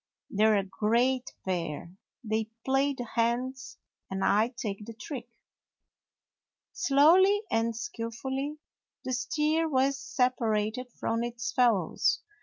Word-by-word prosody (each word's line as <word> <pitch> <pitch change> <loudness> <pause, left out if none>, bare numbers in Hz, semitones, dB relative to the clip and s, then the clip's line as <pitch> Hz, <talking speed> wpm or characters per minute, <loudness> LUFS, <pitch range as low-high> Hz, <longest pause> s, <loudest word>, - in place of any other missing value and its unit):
"They're 215 +1 +4
a 200 - +1
great 235 +6 +1
pair! 170 -3 -3 0.3
They 220 0 -1 0.2
play 270 +1 +2
the 245 - -4
hands 245 +3 -1 0.3
and 190 0 -1
I 210 +3 +4
take 210 -3 -4
the 230 - -8
trick." 240 +1 -7 1.4
Slowly 365 +9 +5
and 225 0 +1
skilfully 265 +3 -4 0.5
the 255 - -3
steer 300 +6 +1
was 275 0 +2
sep 255 -2 +1
arated 220 +2 -1
from 230 0 -2
its 240 +6 -3
fellows. 235 - +2
240 Hz, 115 wpm, -29 LUFS, 220-270 Hz, 1.4 s, Slowly